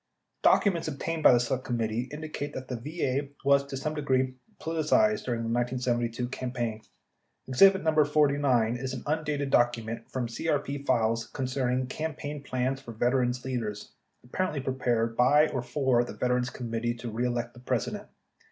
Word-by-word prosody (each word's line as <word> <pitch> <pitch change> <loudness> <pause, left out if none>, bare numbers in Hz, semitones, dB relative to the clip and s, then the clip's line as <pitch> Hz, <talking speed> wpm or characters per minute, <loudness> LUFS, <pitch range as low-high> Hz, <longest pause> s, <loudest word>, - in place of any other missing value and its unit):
Documents 180 -7 +3
obtained 160 +2 -3
by - - +8
the 120 - +5
Select 125 +2 -1
Committee 115 0 -2
indicate 150 -1 -5
that 130 0 -6
the 125 - -2
VA 140 +1 -2 0.2
was, 140 0 +5
to 135 - -5
some 155 +3 -2
degree, 130 -3 +1 0.3
politicized 165 +7 +2
during 120 -2 -1
the 115 - -3
1972 120 0 -1
campaign. 120 -4 -3 0.7
Exhibit 190 +9 +5
No. 160 - +3
49 140 -6 +2
57 125 - -8
is 130 0 -3
an 125 - -7
undated 150 -2 -1
document 115 -1 +1
from 130 -2 -2
CRP 140 +3 -2
files 115 -2 +2
concerning 130 -1 -1
"Cam 155 +5 -4
paign 145 -1 -6
Plans 130 0 -1
for 120 -4 -9
Veterans' 125 +2 +1
Leaders" 110 -5 -4 0.3
apparently 155 +5 -2
prepared 120 -3 0
by 145 +6 +5
or 130 - -2
for 130 -1 +1
the - - -7
Veterans 125 0 0
Committee 120 -1 -3
To 120 -1 -6
Re 120 +3 0
Elect 120 0 -2
the 120 - -14
President. 125 - -2
130 Hz, 160 wpm, -28 LUFS, 120-145 Hz, 0.7 s, by